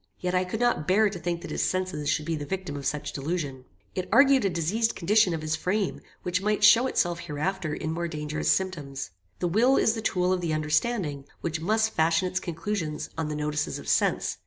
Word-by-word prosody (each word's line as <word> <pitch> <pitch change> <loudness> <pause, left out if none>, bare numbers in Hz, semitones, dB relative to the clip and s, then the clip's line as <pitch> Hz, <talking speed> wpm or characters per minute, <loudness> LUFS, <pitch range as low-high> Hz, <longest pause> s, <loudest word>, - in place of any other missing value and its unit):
Yet 180 0 -2
I 185 0 +2
could 185 +4 -4
not 240 -11 +1
bear 205 +3 +4
to 185 - -6
think 170 0 -3
that - - -7
his - - -1
senses 185 -6 -1
should 150 - 0
be 165 0 -1
the 150 - -4
victims 170 -3 -4
of 140 - -8
such 150 0 -3
delusion. 140 -3 -3 0.3
It 185 - -4
argued 275 -2 +6
a 195 - +2
diseased 190 +7 0
condition 200 +2 +3
of 160 -2 -3
his 155 0 0
frame, 190 +4 -1 0.2
which 180 +1 0
might 210 +1 0
show 235 +5 +7
itself 175 -8 0
hereafter 160 +1 -3
in 155 - -3
more 170 +1 -2
dangerous 150 -1 -1
symptoms. 150 - -2 0.3
The 175 - -1
will 235 +10 +4
is 220 - +3
the 225 - -4
tool 180 -2 +1
of 185 - -1
the 165 -3 -1
understanding, 155 - 0 0.2
which 165 -1 -3
must 220 +5 +2
fashion 160 +3 +2
its 185 +1 -1
conclusions 170 -2 -4
on 160 -1 -2
the 150 - -3
notices 150 0 -2
of - - -10
sense. - - +1
175 Hz, 215 wpm, -27 LUFS, 155-195 Hz, 0.3 s, show